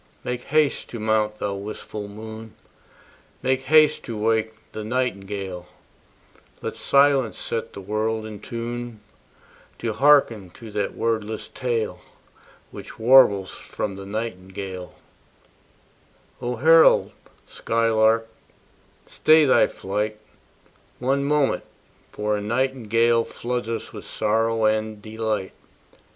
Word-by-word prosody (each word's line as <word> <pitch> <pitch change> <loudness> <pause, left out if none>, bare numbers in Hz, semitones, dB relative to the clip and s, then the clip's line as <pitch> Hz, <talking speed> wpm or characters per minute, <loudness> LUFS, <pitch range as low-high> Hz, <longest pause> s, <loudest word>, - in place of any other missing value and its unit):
Make 125 0 -4
haste 155 0 +1
to 115 - -6
mount, 110 0 +1
thou 100 -1 -3
wistful 105 +1 -6
moon, 110 +1 -9 0.9
Make 130 0 +1
haste 155 +2 +5
to 115 - -5
wake 110 0 0 0.2
the 110 - -6
nightingale: 100 -6 -3 0.9
Let - - -5
silence 140 -4 +3
set 115 - -4
the 100 - -8
world 110 +2 -2
in 105 -2 -8
tune 120 0 -6 0.8
To 115 -2 -3
hearken 135 -8 +4
to 115 -2 -10
that 105 -1 -2
wordless 110 -1 -2
tale 120 -3 -2 0.7
Which - - -10
warbles 110 -5 +5
from 100 -2 -5
the 95 0 -9
nightingale 95 -3 -6 1.5
O 125 0 -2
herald 160 +6 +5 0.3
skylark, 115 0 +1 0.8
stay 155 0 +4
thy 130 - +5
flight 105 +2 -3 0.8
One 135 +3 0
moment, 145 -1 +1 0.5
for 105 0 -1
a 105 - -3
nightingale 115 0 +1
Floods 120 0 -4
us 115 - -4
with - - -9
sorrow 115 +1 0
and 110 0 0
delight. 110 -2 -3
110 Hz, 110 wpm, -23 LUFS, 105-120 Hz, 1.5 s, haste